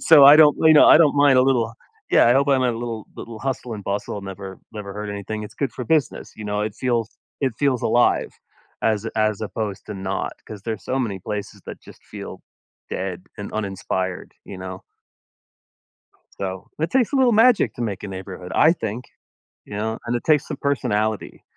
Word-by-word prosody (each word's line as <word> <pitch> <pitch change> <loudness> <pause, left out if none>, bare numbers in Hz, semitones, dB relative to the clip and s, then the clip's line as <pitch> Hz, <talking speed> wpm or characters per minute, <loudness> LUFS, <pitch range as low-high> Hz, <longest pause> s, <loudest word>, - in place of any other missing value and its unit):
So, 150 -4 +7
I 145 +2 +10
don't 150 -2 +6
you 160 0 +7
know, 150 - +7
I - - +9
don't 150 -3 +4
mind 140 -2 +5
a - - +6
little 120 -4 +1 0.4
Yeah, - - +5
I 120 - +6
don't 140 +2 +3
mind 130 -2 +3
a 125 - +2
little 115 -3 -5
little 115 -1 -8
hustle 125 -1 -4
and 100 - -8
bustle 100 0 -3
never 95 0 -8
never 105 -2 -7
hurt 105 0 -5
anything. 100 +2 -5
It's - - -11
good 135 -6 -2
for 125 - -6
business, 150 -1 0
you 105 - -8
know? 105 0 -1
It 105 -1 -3
feels 115 -2 -1 0.3
it 135 -3 0
feels 135 -4 +1
alive 120 +2 +2 0.5
as 110 0 +1
as 110 -2 +1
opposed 105 -2 -4
to 105 - -6
not 95 0 -3
'cause 105 -3 -9
there's 110 -3 -5
so 130 - -1
many 105 -7 -2
places 105 +1 -6
that - - -8
just - - -16
feel - - -9 0.5
dead 95 -1 -4
and 100 - -7
uninspired, 95 -3 -3
you 95 - -8
know? 95 0 -7 1.6
So, 95 -1 -5
it 160 +2 -1
takes 265 0 +2
a - - +2
little 255 -3 +4
magic 230 +1 +4
to 120 - -5
make 100 -4 -3
a 100 - -6
neighborhood, 95 -1 -8
I 160 +2 +6
think, 115 - -5 0.6
you 105 - -8
know? 110 +2 -2
And 120 +1 -1
it 120 - -3
takes 150 -3 +2
some - - -5
personality. 110 -7 -1
110 Hz, 200 wpm, -22 LUFS, 100-135 Hz, 1.6 s, I